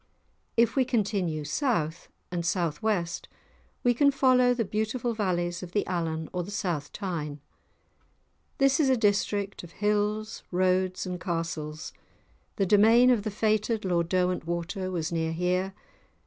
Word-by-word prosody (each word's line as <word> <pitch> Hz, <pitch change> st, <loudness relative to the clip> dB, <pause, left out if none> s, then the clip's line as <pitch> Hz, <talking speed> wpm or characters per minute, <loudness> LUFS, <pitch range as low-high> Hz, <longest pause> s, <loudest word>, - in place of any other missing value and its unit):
If 235 Hz, 0 st, +4 dB
we 265 Hz, -, +4 dB
continue 200 Hz, -, -1 dB
south 165 Hz, -, -1 dB, 0.2 s
and 175 Hz, -1 st, -2 dB
south 170 Hz, -1 st, -1 dB
west 195 Hz, -6 st, -1 dB, 0.6 s
we 245 Hz, -, +4 dB
can 280 Hz, +4 st, +4 dB
follow 255 Hz, -2 st, +4 dB
the 240 Hz, -2 st, 0 dB
beautiful 220 Hz, +4 st, -1 dB
valleys 175 Hz, -5 st, -1 dB
of 180 Hz, -1 st, -9 dB
the 205 Hz, -, +1 dB
Allan 160 Hz, -3 st, -2 dB
or 180 Hz, -, -1 dB
the 175 Hz, -, -7 dB
South 175 Hz, -7 st, -2 dB
Tyne. 160 Hz, -7 st, -4 dB, 1.2 s
This 275 Hz, 0 st, +3 dB
is 285 Hz, -4 st, +3 dB
a 260 Hz, -, +4 dB
district 205 Hz, -2 st, 0 dB
of 170 Hz, -, -12 dB
hills, 210 Hz, +1 st, -1 dB
roads, 185 Hz, +1 st, +1 dB
and 180 Hz, -1 st, -5 dB
castles; 165 Hz, -3 st, -4 dB, 0.6 s
the 195 Hz, -, +1 dB
domain 225 Hz, +6 st, +6 dB
of 235 Hz, -4 st, +3 dB
the 215 Hz, -, -3 dB
fated 215 Hz, +1 st, 0 dB
Lord 170 Hz, -2 st, +1 dB
Derwentwater 180 Hz, +1 st, -1 dB
was 170 Hz, -1 st, -2 dB
near 160 Hz, -1 st, -1 dB
here. 180 Hz, +3 st, 0 dB
190 Hz, 145 wpm, -28 LUFS, 170-220 Hz, 1.2 s, domain